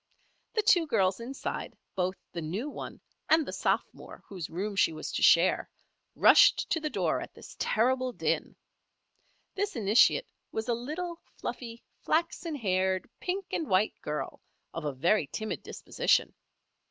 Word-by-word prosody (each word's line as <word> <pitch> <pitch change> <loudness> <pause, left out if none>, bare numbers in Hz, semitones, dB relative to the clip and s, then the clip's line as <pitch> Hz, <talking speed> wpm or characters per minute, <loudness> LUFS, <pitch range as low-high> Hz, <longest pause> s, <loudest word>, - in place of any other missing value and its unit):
The 435 - +2
two 355 -6 +4
girls 195 -7 +2
inside, 255 +4 -5 0.2
both 185 0 -1 0.2
the 170 - -5
new 185 - -3
one - - -8 0.3
and 315 -1 +5
the - - -6
sophomore - - -2
whose 185 -5 -7
room 200 +5 -3
she 195 - +3
was 155 - -6
to - - -2
share, 170 +3 +5 0.5
rushed - - +6
to 325 - +2
the 310 -1 -2
door - - 0
at - - -9
this - - -12
terrible 255 +3 +1
din. - - -1 1.0
This 405 +1 -2
initiate 220 - +4 0.3
was 220 +1 -3
a 240 - +2
little, 320 +9 -4 0.2
fluffy, 235 -2 -6 0.2
flaxen 335 0 -1
haired, 190 -6 0
pink 380 +2 -2
and 320 - -2
white 190 +3 +3
girl, 150 0 -4 0.3
of 165 -2 -5
a 145 - 0
very 165 +5 +2
timid 215 +9 -4
disposition. - - 0
225 Hz, 150 wpm, -29 LUFS, 185-310 Hz, 1.0 s, rushed